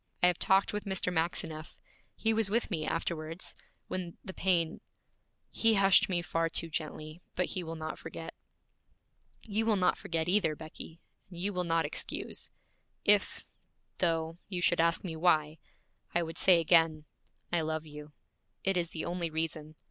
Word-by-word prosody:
I - - +9
have 180 -1 +3
talked 195 +2 +3
with 210 - -3
Mr. 190 -2 0
Maxineff. 160 -1 -1 0.4
He 225 0 +1
was 220 -2 +2
with 230 +1 0
me 155 -4 -1
afterwards, 165 +1 -3 0.3
when 180 -2 -5
the 190 - -6
pain 170 -4 +1 0.7
He 225 -1 +3
hushed 195 -1 +6
me 175 -2 0
far 165 +1 0
too 165 0 0
gently, 155 +1 -5
but 180 - +1
he 185 - -2
will 165 0 -5
not 155 0 -5
forget. - - -7 1.1
You 220 +1 -1
will 220 - +4
not 185 -2 +2
forget 165 -5 -2
either, 180 -4 +2
Becky, 160 +1 -10 0.3
and 175 - -11
you 200 +3 -1
will 180 -1 -1
not 165 -1 +2
excuse. - - -1 0.6
If, 205 -1 +3 0.5
though, 165 -1 0
you 185 -3 -3
should 170 -1 +3
ask 165 0 +2
me 170 -4 -4
why, 155 -2 +2 0.6
I 175 - +3
would 165 0 -5
say 180 -3 +6
again, 165 -2 +3 0.5
I 170 - +3
love 160 0 -2
you. 150 0 -11 0.5
It 195 -1 +1
is 170 -2 0
the 160 - -4
only 175 -1 -2
reason. 155 -1 -3
170 Hz, 165 wpm, -31 LUFS, 160-185 Hz, 1.1 s, I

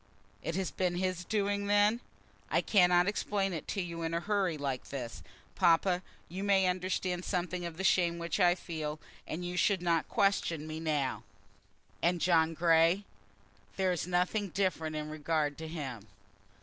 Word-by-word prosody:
"It 165 - -3
has 190 -1 -1
been 180 -2 -1
his 185 -1 -1
doing 200 0 -1
then?" 205 +3 +4 0.5
"I - - +2
cannot 180 -3 +4
explain 200 -2 0
it 160 - -5
to 195 - -2
you 170 -1 -6
in 165 0 -2
a - - +1
hurry 190 -3 0
like 135 -3 -3
this. 125 -4 -6 0.3
Papa, 180 0 +3 0.3
you 185 +4 -5
may 195 -2 +4
understand 185 0 -1
something 180 -1 -2
of 165 -1 -6
the 190 - -3
shame 175 -3 +3
which 170 +3 -3
I 175 -2 +5
feel, 155 -4 -5 0.3
and 175 +3 -4
you 175 0 -4
should 185 +1 +2
not 170 -2 +1
question 195 -7 +1
me 155 0 -5
now." 150 -4 -1 0.8
"And 175 +1 +2
John 165 -2 +3
Grey?" 165 +3 +4 0.7
"There 190 -1 +1
is 175 -1 -2
nothing 180 +3 0
different 170 -4 -1
in 150 0 -3
regard 155 -1 -1
to 160 - -5
him." 135 -10 -6
175 Hz, 165 wpm, -31 LUFS, 160-190 Hz, 0.8 s, I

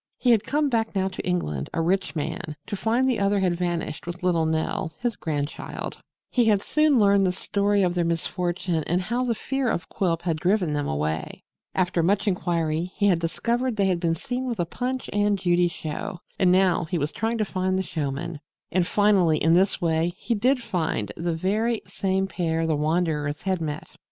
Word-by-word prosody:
He 250 - +3
had 225 -3 +4
come 295 +4 +1
back 225 -5 0
now 190 0 +1
to 190 - -6
England, 75 - -2
a - - 0
rich 180 -3 0
man, 150 0 -3
to - - -4
find 230 +6 +1
the 250 -5 +1
other 200 0 +2
had 185 -2 +1
vanished 175 -2 -3
with 175 +1 -6
little 170 -3 +2
Nell, 160 0 -1
his 240 -3 -1
grandchild. 145 -2 -4 0.4
He 245 -2 +3
had 205 -3 +3
soon 305 -3 +3
learned 200 -2 +5
the - - +2
story 200 +2 +1
of 180 -1 +2
their 175 -1 +1
misfortune 170 0 -1
and 175 +2 +2
how 235 +7 -1
the 240 -2 0
fear 270 +2 -1
of 165 -6 -2
Quilp 170 -4 -1
had 165 -3 0
driven 180 -2 +1
them 145 -1 -1
away. 75 +2 -3 0.3
After 180 -2 +1
much 200 +5 +1
inquiry 170 -2 0
he 205 - +1
had 185 -4 +4
discovered 235 +9 -1
they 200 -2 +2
had 185 -2 +1
been 165 -1 +1
seen 250 +9 -3
with 235 -5 -3
a 175 - +2
Punch 255 +8 -3
and 205 0 +2
Judy 175 -1 +3
show 165 +1 -5 0.2
and 185 -2 +5
now 185 -2 +3
he 170 +2 -2
was 150 0 -1
trying 225 +1 -1
to 215 - +1
find 185 -1 -1
the 190 - 0
showmen. 150 -1 -3 0.3
And 180 -1 +2
finally, 195 -6 +4
in 160 +2 +3
this 190 +3 +3
way, 165 0 +1
he 235 - -1
did 250 +4 +2
find 160 - -1
the 170 0 -2
very 215 +7 0
same 190 0 0
pair 165 -4 -1
the 160 -1 +1
wanderers 150 -1 0
had 190 -3 0
met! 150 -2 -4
180 Hz, 200 wpm, -25 LUFS, 165-205 Hz, 0.4 s, learned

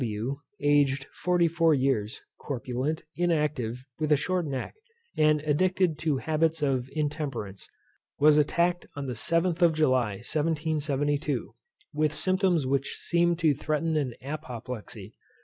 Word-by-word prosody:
W, 115 +5 -3 0.2
aged 145 -3 +2
forty 180 -1 +2
four 165 -1 +3
years, 130 -6 0 0.2
corpulent, 130 +3 -3
inactive, 150 -8 0
with 155 -1 -1
a 150 - +6
short 180 +2 -1
neck, 135 -2 -4 0.4
and 155 -1 +3
addicted 170 +2 +1
to 155 -4 +1
habits 160 +2 0
of 130 -2 0
intemperance, 145 - -3 0.5
was 150 +1 +6
attacked 170 +4 +1
on 145 -1 -4
the 130 - -3
7th 170 - +1
of 170 -2 +5
July 130 -8 +2
1772, 145 - -1 0.4
with 150 0 +1
symptoms 185 -2 +2
which 135 +1 -1
seemed 170 0 +1
to 160 -4 +3
threaten 155 +3 -1
an 135 -6 -1
apoplexy. 120 -7 -7
150 Hz, 130 wpm, -27 LUFS, 130-160 Hz, 0.5 s, a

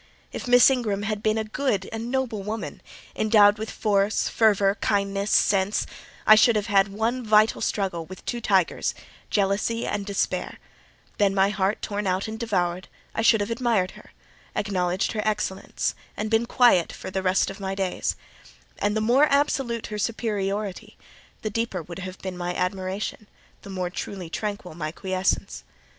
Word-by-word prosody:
If - - -6
Miss 245 0 +7
Ingram 215 -6 -1
had 210 0 -2
been 215 0 +1
a 220 - 0
good 215 -3 -1
and 225 +1 -4
noble 250 -5 -1
woman, 215 +2 -5 0.3
endowed 210 -1 +5
with 220 0 -4
force, 205 -1 +1
fervour, 205 -3 +3
kindness, 200 -1 0
sense, 195 +1 +2 0.4
I 215 - +9
should 220 +2 +6
have 210 -1 0
had 200 -2 +4
one 225 +5 -2
vital 215 0 +4
struggle 180 -5 -1
with 185 0 -11
two 240 -1 -3
tigers—jealousy 200 +2 0
and 205 -1 -2
despair: 200 -1 -2 0.6
then, 200 -1 +3
my 195 0 +4
heart 200 0 -1
torn 205 -1 -2
out 185 +3 0
and 220 0 -6
devoured, 185 -5 -1 0.3
I - - -1
should 225 -1 +5
have 205 +3 -2
admired 230 -6 +1
her—acknowledged 185 -2 -4
her 215 - -2
excellence, 210 -3 -2 0.2
and 215 +1 -3
been 225 +1 +2
quiet 235 -9 +4
for - - -8
the 190 - -1
rest 185 +1 +2
of 195 - -11
my 195 -1 -3
days: 190 -2 -1 0.6
and 205 +1 +1
the - - 0
more 250 +7 +4
absolute 270 -5 +1
her 210 - -3
superiority, 205 -3 -2 0.5
the 215 - -2
deeper 215 -5 -2
would 170 +3 -9
have 185 0 -7
been 190 -1 -4
my 180 0 -3
admiration—the 190 +2 -5
more 185 -2 -3
truly 180 -2 -6
tranquil 200 -5 -4
my 155 -1 -4
quiescence. 185 - -2
205 Hz, 160 wpm, -25 LUFS, 190-220 Hz, 0.6 s, I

